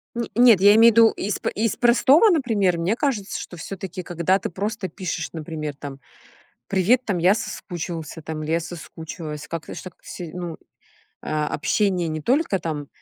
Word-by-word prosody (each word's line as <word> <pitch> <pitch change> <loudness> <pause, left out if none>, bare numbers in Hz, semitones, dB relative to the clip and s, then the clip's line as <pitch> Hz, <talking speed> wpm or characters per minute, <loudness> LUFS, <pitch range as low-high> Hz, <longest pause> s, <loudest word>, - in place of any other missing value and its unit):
Нь 235 0 -1
нет, 235 -5 +7
я 205 +1 +8
имею 230 +1 +7
в - - -13
виду 230 -1 +8
из 205 +2 -3
п - - -1
из 220 -1 -1
простого. 265 - +5
Например, 220 - +2
мне 180 +7 0
кажется, 230 -9 -2
что 175 - -8
всё-таки, 185 +1 -6
когда 175 +2 0
ты - - -4
просто 205 +3 -3
пишешь, 170 -2 -4
например, 155 -2 -5
там: 140 -1 -8 0.7
"Привет", 210 +7 +2
там, 200 -6 -1
"я 180 +4 +4
соскучился", 170 -7 -6
там, 155 0 -5
или 155 - -2
"я 165 - +2
соскучилась". 160 -2 -8
Как-то 165 -1 -6
ж - - -8
так 185 -2 -10
се 170 -3 -8
ну, 175 -3 -5 0.7
а, 155 -1 -1
общение 180 +1 0
не 155 0 -3
только 245 - +1
там, 150 -3 -4
180 Hz, 180 wpm, -23 LUFS, 160-215 Hz, 0.7 s, я